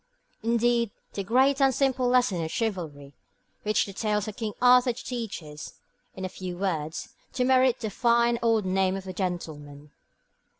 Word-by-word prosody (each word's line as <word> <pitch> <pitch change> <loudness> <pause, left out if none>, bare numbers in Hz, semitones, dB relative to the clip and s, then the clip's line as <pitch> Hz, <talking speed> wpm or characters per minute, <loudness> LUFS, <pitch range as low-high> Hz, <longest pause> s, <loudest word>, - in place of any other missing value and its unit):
Indeed, 235 0 +2 0.2
the 200 - -3
great 265 +6 +3
and 270 -1 +5
simple 260 -2 +1
lesson 245 -9 +2
of 160 - -3
chivalry 160 -10 -4 0.5
which 215 0 +1
the 195 - -8
tales 210 0 -1
of 215 - -6
King 215 -2 -4
Arthur 250 0 +5
teach 235 -6 -5
is, 150 0 -9 0.4
in 190 - -5
a - - -1
few 180 -1 -7
words, 165 -5 -3 0.2
to 250 - 0
merit 255 -1 +3
'the 220 -2 -3
fine 235 +2 +2
old 225 -3 +2
name 190 0 +1
of 195 - -8
gentleman.' 150 -6 -5
215 Hz, 160 wpm, -27 LUFS, 180-240 Hz, 0.5 s, and